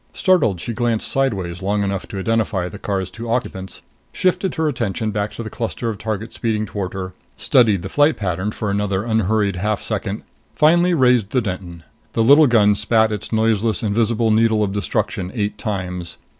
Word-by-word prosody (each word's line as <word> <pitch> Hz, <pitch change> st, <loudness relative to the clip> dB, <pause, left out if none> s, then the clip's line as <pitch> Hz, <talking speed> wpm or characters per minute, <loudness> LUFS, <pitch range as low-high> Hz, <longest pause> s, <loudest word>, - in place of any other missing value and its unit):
Startled, 155 Hz, -, +2 dB
she 120 Hz, -, -4 dB
glanced 115 Hz, -1 st, 0 dB
sideways 95 Hz, -10 st, -1 dB
long 100 Hz, +2 st, 0 dB
enough 100 Hz, -1 st, -3 dB
to 100 Hz, -, -7 dB
identify 105 Hz, -2 st, 0 dB
the 100 Hz, +2 st, -9 dB
car's 95 Hz, -2 st, -3 dB
two 115 Hz, +4 st, -7 dB
occupants, 95 Hz, -6 st, -3 dB, 0.3 s
shifted 185 Hz, 0 st, 0 dB
her 160 Hz, -1 st, 0 dB
attention 110 Hz, -6 st, -2 dB
back 105 Hz, 0 st, -2 dB
to 115 Hz, -, -6 dB
the 110 Hz, -, -6 dB
cluster 115 Hz, 0 st, -3 dB
of 105 Hz, -3 st, -5 dB
targets 110 Hz, 0 st, -4 dB
speeding 110 Hz, -2 st, -1 dB
toward 100 Hz, -4 st, -4 dB
her, 95 Hz, -1 st, -5 dB, 0.2 s
studied 110 Hz, -8 st, +3 dB
the -, -, -4 dB
flight 145 Hz, +9 st, +2 dB
pattern 95 Hz, 0 st, -2 dB
for 105 Hz, -1 st, -3 dB
another 100 Hz, -1 st, -1 dB
unhurried 110 Hz, -3 st, +1 dB
half 105 Hz, +3 st, -1 dB
second, -, -, -3 dB, 0.3 s
finally 175 Hz, +3 st, +4 dB
raised 125 Hz, -7 st, +3 dB
the 130 Hz, -, +1 dB
Denton. 90 Hz, -5 st, -6 dB, 0.3 s
The 115 Hz, -, +2 dB
little 145 Hz, +5 st, +7 dB
gun 105 Hz, -4 st, +4 dB
spat 110 Hz, +2 st, +2 dB
its 105 Hz, -2 st, -4 dB
noiseless, 110 Hz, 0 st, +1 dB
invisible 110 Hz, +1 st, +1 dB
needle 110 Hz, 0 st, +3 dB
of 100 Hz, -2 st, -2 dB
destruction 95 Hz, -2 st, -2 dB
eight 105 Hz, -2 st, -2 dB
times. 90 Hz, -5 st, -3 dB
110 Hz, 180 wpm, -20 LUFS, 100-115 Hz, 0.3 s, little